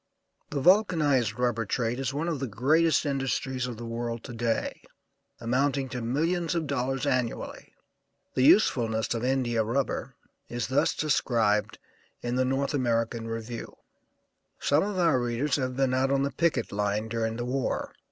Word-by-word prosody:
The 145 - -2
vulcanized 150 - +3
rubber 120 -2 +1
trade 115 +3 -1
is 135 -1 -1
one 150 +5 -2
of 165 -5 -1
the 135 - -2
greatest 155 +10 +2
industries 135 -2 -1
of 120 -3 -6
the 120 - -7
world 115 0 -4
to 125 - -8
day, 115 -1 -1 0.6
amounting 135 +3 0
to 125 -2 -4
millions 165 +8 0
of 165 -2 0
dollars 135 0 -1
annually. 130 -4 -2 0.6
The - - 0
usefulness 115 - +4
of 115 0 -3
India 125 -3 +1
rubber 130 +2 -2 0.3
is 120 -1 -2
thus 130 - +2
described 115 -8 +1 0.5
in 120 0 -2
the 130 +1 +2
North 135 +2 0
American 115 -3 0
Review: 115 +1 -6 0.8
"Some 145 +2 +3
of 205 -1 -2
our 165 -7 +3
readers 120 +4 0
have 130 -2 -2
been 135 -2 +2
out 130 +1 +2
on 135 0 +2
the 140 - -1
picket 140 -4 0
line 105 +1 -1
during 115 0 -2
the 120 +1 -3
war. 130 +1 -2
130 Hz, 160 wpm, -28 LUFS, 115-140 Hz, 0.8 s, usefulness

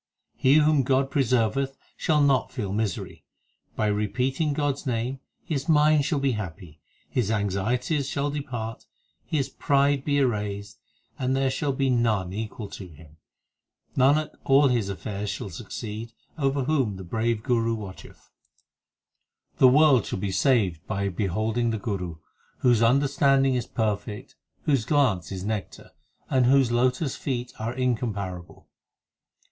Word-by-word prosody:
He 130 +2 +4
whom 155 -1 +4
God 135 +1 +1
preserveth 135 +1 +1 0.2
shall 155 -3 +2
not 140 -3 +2
feel 105 -7 -4
misery; 105 -4 -3 0.5
By 110 - 0
repeating 125 +8 0
God 145 -1 +1
s 140 +1 -10
name 125 +2 -2 0.2
his 150 0 -3
mind 150 -1 +4
shall 155 - 0
be 140 -1 +1
happy, 90 -7 -7 0.3
His 120 -5 -1
anxieties 115 - 0
shall 145 0 -1
depart, 125 -6 -5 0.4
his 140 -4 -1
pride 140 0 +1
be 145 0 +1
erased, 105 -5 -1 0.4
And 130 0 0
there 135 0 +1
shall 140 +2 -1
be 135 0 0
none 110 -7 +1
equal 110 0 -5
to 95 - -8
him 80 -1 -16 0.8
Nanak, 145 +4 +3
all 140 +1 +5
his 115 -5 0
affairs 100 +1 -4
shall 100 - -5
succeed 110 +4 -7 0.2
Over 140 -2 0
whom 130 -7 0
the 95 - -8
brave 115 +5 0
l 105 - -15
Guru 115 -2 +1
watcheth. 100 -4 -11 1.2
8 - - -35
The 130 - +8
world 135 -3 +5
shall - - -3
be 95 +1 -2
saved 95 - +2
by 100 -1 -1
beholding 110 +5 -1
the 110 - -1
Guru, 95 -6 -4 0.5
Whose 120 -3 +4
understanding 135 +2 +3
is 125 -1 -2
perfect, 105 -2 -3 0.3
whose 135 -6 +2
glance 110 - +1
is 95 -1 -5
nectar, 105 -1 -5 0.4
And 130 -2 +3
whose 135 -2 +4
lotus 130 +4 +1
feet 125 -3 -4
are 115 +3 -3
incomparable. 105 -8 -3
120 Hz, 145 wpm, -26 LUFS, 105-135 Hz, 1.2 s, The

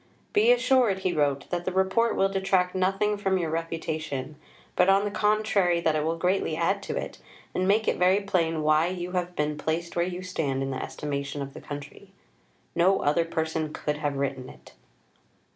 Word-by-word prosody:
"Be 440 +3 +5
assured," 260 - +3
he 185 -2 0
wrote, 145 -3 0
"that 175 -1 -1
the 185 - -2
Report 190 +5 +2
will 195 - +3
detract 190 -2 +1
nothing 195 +3 +1
from 195 -2 +1
your 165 -3 -2
reputation 160 -4 -3 0.4
but, 180 +1 +4
on 195 +1 +4
the 205 - -2
contrary, 210 -4 +2
that 160 -2 +1
it 150 - 0
will 165 +2 -1
greatly 180 -1 0
add 195 +5 +1
to - - -4
it, - - -5 0.3
and 185 - 0
make 215 +3 +3
it - - +1
very 185 +2 +4
plain 165 -5 0
why 155 +2 +4
you 180 0 -4
have 180 -1 -2
been 150 0 -1
placed 165 +2 -2
where 170 - +2
you 180 +1 -4
stand 145 -7 -2
in 135 - -3
the 130 - -3
estimation 140 -1 -4
of 135 0 -9
the - - -10
country. 145 0 -9 0.6
No 185 +3 +3
other 150 +4 +3
person 160 -1 -2
could 150 0 -2
have 145 -2 -2
written 135 -2 -3
it." - - -15
175 Hz, 195 wpm, -27 LUFS, 155-190 Hz, 0.6 s, Be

